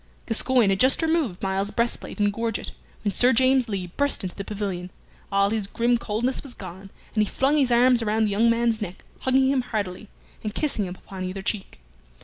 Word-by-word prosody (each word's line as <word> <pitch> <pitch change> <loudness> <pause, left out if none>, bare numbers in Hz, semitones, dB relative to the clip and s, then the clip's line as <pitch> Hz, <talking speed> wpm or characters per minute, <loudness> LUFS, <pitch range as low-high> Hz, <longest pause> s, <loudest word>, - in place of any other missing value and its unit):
Gascoyne 235 -2 +3
had 195 - 0
just 260 +5 +4
removed 315 - 0
Myles's 195 +1 0
breastplate 235 0 -2
and 205 -1 +2
gorget, 230 0 -2 0.3
when 205 - +1
Sir 245 +4 +4
James 255 0 +3
Lee 195 -3 -2
burst 285 -5 +1
into 185 - -4
the 200 - -5
pavilion. 195 -3 -4 0.4
All 200 0 +3
his 215 -3 -1
grim 235 +2 +1
coldness 235 +4 -1
was 270 -4 -8
gone, 190 +1 -9 0.2
and 215 - +2
he 210 - -3
flung 275 +3 +2
his 265 -4 +3
arms 245 0 +5
around 220 0 +1
the 210 - -1
young 225 +4 +3
man's 230 -1 +1
neck, 190 -2 -6 0.2
hugging 265 0 +3
him 270 -2 +2
heartily, 210 -4 -4 0.3
and 215 -1 -4
kissing 275 -9 0
him 180 0 -6
upon 190 0 -8
either 190 +1 -5
cheek. 195 - -4
220 Hz, 200 wpm, -25 LUFS, 195-245 Hz, 0.4 s, arms